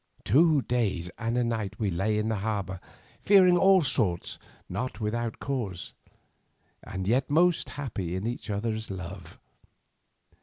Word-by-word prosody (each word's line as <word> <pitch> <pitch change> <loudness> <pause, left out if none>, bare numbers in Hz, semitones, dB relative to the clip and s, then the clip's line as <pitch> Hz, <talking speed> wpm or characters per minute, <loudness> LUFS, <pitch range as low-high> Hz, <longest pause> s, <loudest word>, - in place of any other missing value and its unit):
Two 155 -1 +4
days 95 -8 -1
and 115 +1 -1
a 125 - +2
night 110 -4 -2
we 105 -3 0
lay 100 +5 0
in 105 +1 0
the 110 -1 0
harbour, 100 -3 -3 0.4
fearing 185 -3 +6
all 190 +1 +5
things 105 - -1 0.3
not 125 0 -4
without 115 +1 -2
cause, 115 -11 -4 0.9
and 95 0 -5
yet 125 +5 +2
most 170 +3 +3
happy 100 -11 -4
in 95 +3 -3
each 120 0 -4
other's 110 +2 -2
love. 95 -2 -8
110 Hz, 140 wpm, -28 LUFS, 95-130 Hz, 0.9 s, fearing